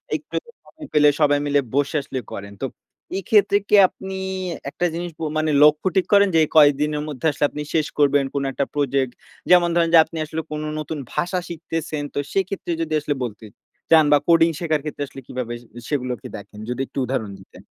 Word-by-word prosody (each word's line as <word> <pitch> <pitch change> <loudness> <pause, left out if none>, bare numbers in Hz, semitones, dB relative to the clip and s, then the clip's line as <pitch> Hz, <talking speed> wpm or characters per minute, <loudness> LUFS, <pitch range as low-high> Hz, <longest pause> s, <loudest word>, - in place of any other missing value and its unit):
একটু - - -7 0.3
সময় 315 -2 -12
পেলে 150 -1 +6
সবাই 145 -1 +4
মিলে 145 0 +2 0.2
বসে 140 +1 +1
আসলে 135 -1 -5
করেন। 100 0 -7
তো - - 0 0.5
এক্ষেত্রে 200 +1 +3
কি - - +6
আপনি 190 +1 -9 0.6
একটা 175 - -2
জিনিস 175 +1 -4
প - - -10 0.2
মানে 155 0 +1
লক্ষ্য 150 +4 +4
ঠিক 190 - +3
করেন 200 0 +6
যে, - - +6 0.2
কয়দিনের 150 0 +4
মধ্যে 145 -2 -6
আসলে 145 - 0
আপনি 150 - -6
শেষ 155 -2 +1
করবেন, 145 -1 +4
কোন 140 - -1
একটা 140 - -1
প্রজেক্ট? 140 -3 0 0.4
যেমন 175 -1 +6
ধরেন 170 -1 +3
যে - - +9
আপনি 160 - -9
আসলে 160 +1 -4
কোন 150 0 -3 0.2
নতুন 155 +1 -5 0.2
ভাষা 180 +1 -1
শিখতেছেন, 160 -2 -4
তো - - -1
সেক্ষেত্রে 195 -2 -2
যদি 160 -1 -2
আসলে 145 0 -2
বলতে 110 -2 -6 0.5
চান 160 -2 +7
বা 145 - +7
কোডিং 165 -1 +5
শেখার 155 -3 0
ক্ষেত্রে 150 -1 -4
আসলে 135 - -11
কিভাবে 125 -2 -4
সে 120 - -20 0.2
সেগুলোকে 125 -5 -3
দেখেন? 105 +1 -12
যদি 125 +1 -2
একটু - - -14
উদাহরণ 115 -5 -3
দিতেন? 95 - -16
150 Hz, 190 wpm, -22 LUFS, 140-165 Hz, 0.6 s, যে